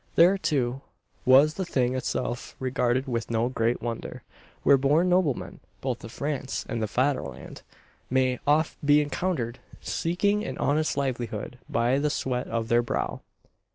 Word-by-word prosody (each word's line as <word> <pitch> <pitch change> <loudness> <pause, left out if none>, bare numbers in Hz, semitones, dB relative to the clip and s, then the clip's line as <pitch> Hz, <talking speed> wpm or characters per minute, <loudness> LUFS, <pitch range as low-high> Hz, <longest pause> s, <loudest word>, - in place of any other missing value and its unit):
There, 175 +4 +6
too, 135 -8 -1 0.4
was 135 +4 +6
the 190 - -3
thing 130 -7 0
itself 125 -1 -3
regarded 130 0 0
with 115 -2 -2
no 115 +1 +1
great 115 -1 0
wonder; 115 -1 -5 0.4
where - - +7
"born 145 +7 +3
noblemen," 175 -7 0 0.2
both 130 -3 -3
of 115 - -8
France 140 0 -3
and 120 -3 -3
the 110 - 0
"Faderland," 105 - -2 0.5
may 130 -1 +2
oft 150 +2 +2
be 145 +1 +5
encountered 145 -5 -2 0.2
seeking 200 +5 0
an - - -5
honest 155 +2 +1
livelihood 125 -3 -3
by 120 +4 +2
the 150 +1 +1
sweat 125 -3 -2
of 115 -1 -2
their 120 0 +4
brow. 120 - -3
130 Hz, 150 wpm, -27 LUFS, 120-150 Hz, 0.5 s, where